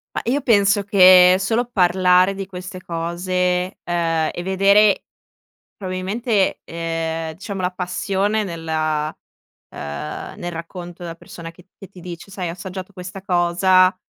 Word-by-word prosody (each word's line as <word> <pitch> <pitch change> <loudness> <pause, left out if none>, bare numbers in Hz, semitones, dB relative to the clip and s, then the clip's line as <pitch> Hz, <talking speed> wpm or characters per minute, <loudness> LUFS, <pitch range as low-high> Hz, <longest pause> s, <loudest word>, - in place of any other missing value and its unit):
Ma - - -1
io 265 +5 +1
penso 205 -4 +3
che 185 -2 +7
solo 225 +5 0
parlare 185 0 +4
di 195 0 -5
queste 185 0 -8
cose, 180 +2 -1
uhm, 165 -2 0
e - - -5
vedere 195 +2 +4 0.7
probabilmente, 195 +3 -1
uhm, 165 -1 -3
diciamo, 195 +2 -6
la 180 +1 0
passione 195 +3 -1
nella, 155 -3 -2 0.5
ehm, 75 0 -6
nel 175 - -4
racconto 175 +1 -8
della 165 -1 -6
persona 165 0 -10
che 180 +2 -20
che 195 - -11
ti 190 -2 -14
dice: 175 +2 -9
“Sai, 185 -3 -4
ho - - -4
assaggiato 185 +1 -8
questa 185 +1 -8
cosa, 185 0 +3
180 Hz, 135 wpm, -21 LUFS, 170-195 Hz, 0.7 s, che